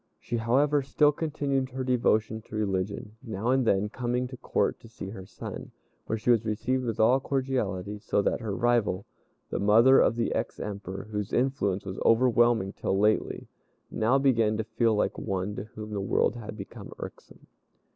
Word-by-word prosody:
She, 120 - -3
however, 140 +6 +2
still 145 +2 +3
continued 140 -4 -1
her 130 0 -4
devotion 110 -3 +1
to - - -8
religion, 100 +1 -2
now 115 -1 -2
and 130 -2 +2
then 100 0 +3
coming 125 +2 -2
to 125 - -8
Court - - 0
to 115 - -15
see 105 -4 -8
her 95 -2 -9
son, - - -8 0.4
where 110 - -1
she 115 +3 +2
was 115 -2 +3
received 125 +4 -1
with 115 -1 -3
all 120 +4 +5
cordiality; 110 -8 -2
so 105 - 0
that - - 0
her 105 -3 -3
rival, 115 -5 +1 0.5
the - - -1
mother 115 +6 +6
of - - +3
the 115 -1 0
ex - - -3
Emperor, 100 -2 -5
whose 105 -1 -3
influence 120 -8 0
was 95 -1 -5
overwhelming 120 -4 +3
till 95 - -1
lately, 105 +2 +1 0.4
now 115 +5 +2
began 115 -6 +2
to 110 - -1
feel 115 0 +1
like 105 - 0
one 95 +1 -2
to 100 - -5
whom 110 0 -9
the 100 -2 -2
world 100 +2 +1
had 110 -2 -7
become 100 - -9
irksome. - - -10
110 Hz, 180 wpm, -28 LUFS, 105-125 Hz, 0.5 s, mother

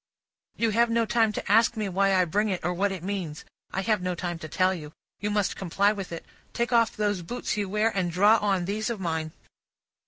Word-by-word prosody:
"You 230 -1 +1
have 235 +2 +3
no 230 0 +2
time 225 -1 +2
to 200 - -3
ask 225 +2 +4
me 215 -2 -1
why 195 +1 +2
I 185 -1 +4
bring 210 +6 0
it, 185 -4 -3
or 175 - +1
what 195 +3 0
it 185 -3 -6
means; 185 -6 -4 0.3
I 190 - -1
have 210 -1 +1
no 180 0 -2
time 175 -1 -4
to 155 - -7
tell 185 +4 +2
you. 155 -4 -8 0.3
You 205 - -2
must 205 -2 0
comply 195 +2 +1
with 195 -4 -6
it 165 - -6 0.3
take 240 +1 -1
off 230 -1 +3
those 205 -3 0
boots 240 +10 -3
you 205 -2 -2
wear, 210 +3 +2
and 185 -3 0
draw 205 +6 +5
on 195 -4 0
these 215 +4 -2
of 230 -3 -3
mine." 160 -3 -2
200 Hz, 230 wpm, -26 LUFS, 180-215 Hz, 0.3 s, draw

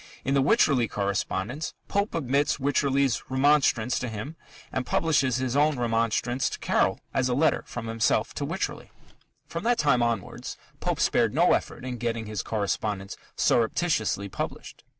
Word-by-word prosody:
In 135 - +1
the 140 - +4
Wycherley 135 -3 +3
correspondence, 100 +7 -2
Pope 200 0 -1
omits 140 -1 +1
Wycherley's 140 -1 +1
remonstrance 130 -3 +3
to 125 - -3
him 110 +9 -6 0.4
and 130 - -1
publishes 135 -2 +1
his 130 0 -1
own 150 0 +3
remonstrance 120 +1 0
to - - -6
Caryll - - +1
as 130 -1 +1
a 125 - +1
letter 160 +4 +3
from 120 -2 -6
himself 115 -1 +1
to 145 - -4
Wycherley. 165 +7 -3 0.6
From - - -5
that 240 0 +3
time 135 -5 +3
onwards 115 -5 -2 0.2
Pope - - -1
spared - - +2
no - - +5
effort - - -2
in 125 -2 -4
getting 115 -2 -2
his 105 -1 -3
correspondence 100 -2 -2 0.2
"surreptitiously" 110 - +1
published. 95 - -6
125 Hz, 150 wpm, -26 LUFS, 115-140 Hz, 0.6 s, no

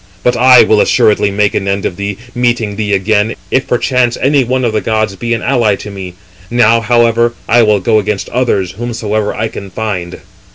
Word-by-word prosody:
But 125 - +2
I 125 +1 +6
will 110 -1 +3
assuredly 105 -1 +2
make 100 +1 0
an 100 - -2
end 100 -1 -1
of - - -2
thee, 100 0 -4 0.2
meeting 120 -4 -1
thee 105 -1 -3
again, 105 +3 +1 0.2
if 130 - 0
perchance 125 -1 0
any 140 0 +2
one 130 +1 -1
of 115 - -1
the 110 - 0
gods 110 -3 -1
be 115 +5 -5
an - - -6
ally 110 -4 +1
to 105 - -9
me. 95 -2 -8 0.3
Now, 115 -1 +3
however, 120 0 +2
I 120 +1 +4
will 105 -2 +3
go 110 +3 +2
against 105 -1 -3
others, 105 -7 -1
whomsoever 110 -1 -3
I 110 - -2
can 100 -2 -9
find." 90 -4 -5
110 Hz, 200 wpm, -12 LUFS, 100-120 Hz, 0.3 s, I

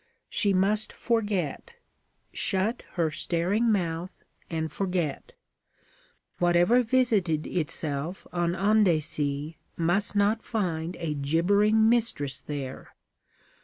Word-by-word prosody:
She 205 - +2
must 200 +3 +1
forget 205 - -2 0.6
shut 195 +5 0
her 165 -3 0
staring 185 +9 +1
mouth 175 -3 -2 0.3
and 160 -2 -3
forget. 180 -5 -2 1.1
Whatever 175 +7 +4
visited 220 -11 +1
itself 155 0 -3
on 175 0 0
Andecy 160 -7 +1 0.2
must 175 +5 +1
not 205 +2 +2
find 175 -6 -2
a 165 -3 -3
gibbering 200 +10 +3
mistress 225 - +1
there. 140 -3 -7
175 Hz, 90 wpm, -27 LUFS, 160-210 Hz, 1.1 s, Whatever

